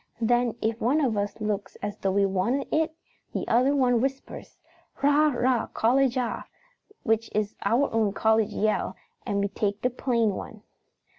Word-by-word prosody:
Then 240 0 +2
if 225 +1 -1
one 255 +7 +2
of 255 -7 +1
us 205 +1 -2
looks 210 -2 -3
as 205 0 -3
though 195 - 0
we 200 +1 +2
wanted 195 +9 0
it 315 0 +1 0.4
the - - -3
other 255 +5 +3
one 245 -4 +3
whispers, 270 +1 -5 0.5
'Rah 290 +2 +5
rah 255 - -3
rah, 245 -1 +1
college 255 +2 +2
ah,' 245 -2 -2 0.6
which 225 +1 +1
is 210 -1 -1
our 270 +5 +3
own 220 -3 +2
college 220 +1 +2
yell, 215 0 0 0.3
and 200 0 0
we 200 - +1
take 200 +1 -2
the 250 - +2
plain 235 -3 +1
one. 215 +2 -8
230 Hz, 170 wpm, -26 LUFS, 210-255 Hz, 0.6 s, Rah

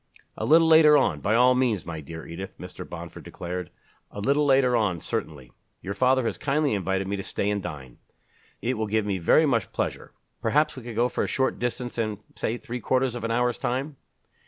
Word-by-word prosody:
"A - - -3
little 165 +2 +6
later 160 -2 +7
on, - - +1
by 105 +2 +1
all 125 +2 +6
means, 125 -7 +1
my 80 -2 -5
dear 80 +2 -9
Edith," 95 +3 -8
Mr. 90 0 -9
Bomford 85 -1 -8
declared. 90 -1 -6 0.4
"A - - -8
little 140 +7 +2
later 135 -2 +4
on, 100 -7 +1
certainly. 70 -5 -5 0.3
Your 100 - -3
father 130 +4 +2
has - - -2
kindly 145 -1 +1
invited 95 -1 -1
me 100 +1 -2
to - - -3
stay 100 +1 -1
and 100 -1 -1
dine. 70 -8 -8 0.6
It 125 -1 -1
will 110 - -1
give 110 0 0
me 100 -2 -1
very 120 - +4
much 115 -8 0
pleasure. - - -3 0.3
Perhaps 150 +1 +2
we 130 - -8
could 120 -1 -8
go 120 +2 +3
for - - -2
a - - -1
short 130 -1 0
distance 120 0 -3
in 110 -2 -1 0.2
say 115 - -2
three 125 -1 -6
quarters 130 +1 +1
of 120 -2 -6
an 115 - -1
hour's 120 +1 +1
time?" 135 +4 -2
115 Hz, 210 wpm, -26 LUFS, 95-130 Hz, 0.6 s, later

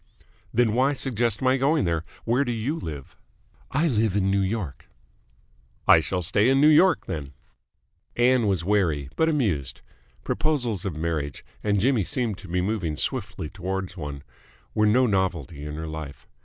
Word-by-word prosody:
"Then 120 -2 +2
why 130 +4 +3
suggest 120 -4 -1
my 130 +1 +4
going 140 -1 +2
there? 85 -2 0 0.2
Where 120 +4 +2
do 120 - -2
you 120 +6 -2
live?" 75 - -7 0.5
"I 155 +5 +1
live 110 - +1
in 95 -1 +2
New 100 0 +2
York." 95 -6 -3 1.0
"I - - +8
shall 90 +4 -2
stay 105 +7 +3
in 135 +1 +4
New 150 +2 +6
York, 165 +2 +5
then." 70 -3 -5 0.8
Ann 120 -2 +3
was 95 -5 0
wary, 85 -9 +1
but 160 0 +2
amused. 80 - -1 0.4
Proposals 125 - -1
of 95 -6 -3
marriage 80 -3 -3 0.2
and 105 -1 +2
Jimmy 125 -1 +2
seemed 110 0 -2
to 100 - -11
be 90 +1 0
moving 95 -5 -1
swiftly 100 - -2
towards 95 +1 -4
one 75 -5 -6 0.5
were 105 0 +3
no 125 +5 +4
novelty 90 - -1
in 75 - -5
her 80 +1 -5
life. 80 -3 -8
100 Hz, 165 wpm, -25 LUFS, 80-125 Hz, 1.0 s, I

